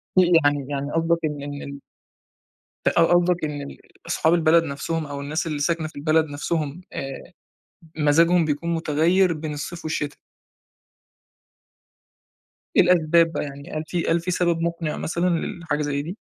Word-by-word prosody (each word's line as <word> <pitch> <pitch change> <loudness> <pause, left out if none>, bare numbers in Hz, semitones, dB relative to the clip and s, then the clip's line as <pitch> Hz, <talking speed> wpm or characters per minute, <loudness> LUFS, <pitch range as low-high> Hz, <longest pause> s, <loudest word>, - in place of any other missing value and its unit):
في 180 -1 +5
يعني 145 -1 +2
يعني 140 0 -3
قصدَك 165 +1 +2
إن 150 -2 -2
ال 140 0 -7 1.1
أ - - +6
ق 165 0 +3
قصدَك 175 -1 +3
إن 150 -1 -3
ال 140 - -9 0.3
أصحاب 160 +2 +2
البلد 165 0 +4
نَفسهم 155 +2 -3
أو 140 -1 -6
الناس 150 +4 -2
اللي 155 -2 -2
ساكنة 160 +1 0
في 155 - -18
البلد 155 +2 +2
نَفسهم 150 +1 -3
آآ 135 0 -6 0.7
مزاجهم 165 +3 +4
بيكون 155 +3 -1
مُتغيّر 165 +4 +2
بين 155 -1 -5
الصيف 165 +4 -6
والشتا؟ 150 -2 -3 2.6
إيه - - +8
الأسباب 170 -1 +4
بقى، - - -2
يعني 140 0 -9
هل 155 0 -3
في 170 +1 -2
هل 170 - +2
في 175 +2 -3
سبب 170 -2 +1
مقنِع 170 -2 -2
مثلًا 175 +2 -1
للحاجة 165 -3 -2
زي 145 -1 -1
دي؟ 170 +6 -6
160 Hz, 155 wpm, -23 LUFS, 145-170 Hz, 2.6 s, إيه